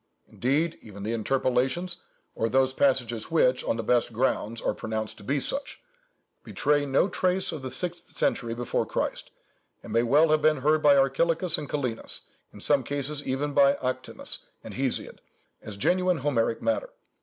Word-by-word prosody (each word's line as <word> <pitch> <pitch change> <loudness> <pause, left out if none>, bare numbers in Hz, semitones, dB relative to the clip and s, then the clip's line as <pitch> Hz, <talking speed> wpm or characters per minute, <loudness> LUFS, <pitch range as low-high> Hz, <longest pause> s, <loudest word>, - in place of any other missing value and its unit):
Indeed, 155 +6 -1
even 100 -2 -10
the 110 +3 -2
interpolations 130 - 0 0.4
(or 115 - -1
those 130 +1 +2
passages 120 -5 +1
which, 130 -6 +3
on - - -1
the 115 - -3
best 120 +2 +2
grounds, 115 -1 -1
are - - -1
pronounced 110 0 -4
to - - -13
be 140 +7 0
such) 275 - -3 0.6
betray 145 0 +1
no 135 +7 +3
trace 185 0 0
of 155 - -6
the 130 - -5
sixth 170 +6 -2
century 115 -2 -1
before 120 0 -1
Christ, - - -3 0.5
and - - -8
may 115 - +4
well 145 +7 +4
have 155 0 +3
been 155 -3 +3
heard 155 +2 +3
by 145 -2 +6
Archilochus 160 +6 +2
and 150 - -7
Kallinus—in 125 -6 -2
some 140 +1 +2
cases 145 +2 -2
even 140 +3 -1
by 140 0 +5
Arktinus 130 0 -2 0.2
and - - -8
Hesiod—as 105 -2 -6
genuine 180 - +2
Homeric 125 -6 0
matter. 285 +13 0
135 Hz, 160 wpm, -27 LUFS, 120-155 Hz, 0.6 s, by